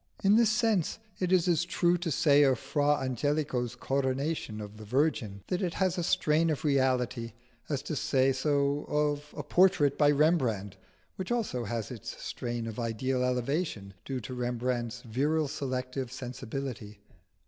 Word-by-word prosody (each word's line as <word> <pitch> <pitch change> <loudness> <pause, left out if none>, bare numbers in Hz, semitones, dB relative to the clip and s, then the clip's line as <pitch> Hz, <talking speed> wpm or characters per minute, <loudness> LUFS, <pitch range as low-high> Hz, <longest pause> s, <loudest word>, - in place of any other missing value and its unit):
In 200 +1 +5
this 230 -1 +5
sense 220 -6 +1 0.2
it 185 -1 0
is 185 -2 +4
as 170 -2 +3
true 175 0 +2
to 175 -1 -2
say 145 0 +4
of 135 -3 +4
Fra 145 +4 +1
Angelico's 130 -2 -1
Coronation 135 -2 -1
of 105 0 -8
the 110 - -10
Virgin, 110 -5 0
that 180 - -2
it 175 -3 -1
has 185 -2 +1
a 180 - -1
strain 160 0 +2
of 155 +1 -2
reality, 130 -4 +1 0.4
as 145 -3 -1
to 155 - -3
say 135 -1 +2
so 140 +1 +1
of 150 0 0
a - - -3
portrait 175 -6 +3
by 145 -1 +6
Rembrandt, 130 - +2 0.4
which 190 +4 -4
also 210 - -1
has 115 +1 -3
its 115 -5 -7
strain 120 -1 -4
of 115 +1 -5
ideal 125 +3 -1
elevation 125 - -1
due 135 -2 -3
to 110 +4 -7
Rembrandt's 125 0 -2
virile 145 +7 0
selective 130 -2 -3
sensibility. 125 -3 -6
135 Hz, 160 wpm, -30 LUFS, 120-155 Hz, 0.4 s, by